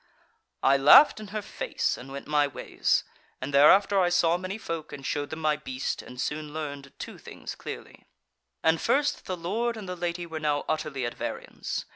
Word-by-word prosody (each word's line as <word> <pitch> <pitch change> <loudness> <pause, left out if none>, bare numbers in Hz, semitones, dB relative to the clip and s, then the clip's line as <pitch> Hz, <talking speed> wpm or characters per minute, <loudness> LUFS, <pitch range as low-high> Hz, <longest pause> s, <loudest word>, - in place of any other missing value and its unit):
"I 135 +1 +5
laughed 150 - +8
in 215 - -8
her 210 +1 -4
face - - -2
and 135 +2 -10
went 140 0 -7
my 150 -1 +2
ways: 140 - 0 0.4
and 135 +2 -5
thereafter 195 +8 +6
I 180 -2 +3
saw 175 -1 +3
many 185 +3 -4
folk 165 -7 -5
and 135 - -8
showed 145 +1 -2
them 160 0 -6
my 155 -1 +2
beast, 130 -3 -4
and 125 - -11
soon 150 +2 -3
learned 145 -3 -6
two - - -8
things - - -8
clearly. - - -9 0.6
"And 160 0 +3
first 290 +1 +2
that - - -20
the 185 -2 -3
Lord 225 +7 -1
and 210 -3 -7
the 180 - -4
Lady 175 0 -3
were 160 -2 -5
now 150 -2 0
utterly 150 -4 -2
at 120 - -3
variance. - - -5
155 Hz, 195 wpm, -27 LUFS, 145-180 Hz, 0.6 s, laughed